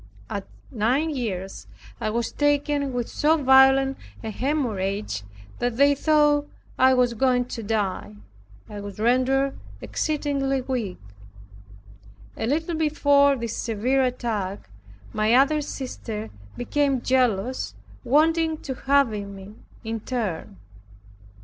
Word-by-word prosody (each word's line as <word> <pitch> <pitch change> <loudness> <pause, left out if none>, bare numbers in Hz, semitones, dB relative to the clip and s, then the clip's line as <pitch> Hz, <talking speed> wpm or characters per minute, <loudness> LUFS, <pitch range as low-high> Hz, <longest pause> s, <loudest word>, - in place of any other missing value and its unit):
At 200 -1 -4 0.2
nine 260 +7 +1
years, 195 -9 -4 0.3
I - - -1
was 230 +1 -1
taken 290 -1 +1
with 245 -2 -2
so 315 +2 +2
violent 270 -1 +5 0.2
a 220 - -4
hemorrhage 210 - -2 0.4
that 245 -1 -1
they 285 +1 +5
thought 295 0 +2 0.3
I 260 0 +6
was 250 -1 +2
going 250 +1 +2
to 230 - -5
die. 205 - -2 0.5
I 205 - -7
was 200 0 -8
rendered 260 +4 +2 0.2
exceedingly 280 -3 -1
weak. 245 -7 -3 1.4
A 225 - -3
little 320 +6 -1
before 285 -2 +3
this 235 -3 -4
severe 240 +4 0
attack, 220 - -2 0.4
my 215 +2 +3
other 280 +4 +4
sister 230 -6 -6 0.3
became 275 +1 0
jealous, 255 -2 0 0.3
wanting 320 +4 +2
to 265 - -3
have 275 0 +2
me 200 -1 -7 0.3
in 225 0 -3
turn. 210 - -4
255 Hz, 115 wpm, -24 LUFS, 220-280 Hz, 1.4 s, I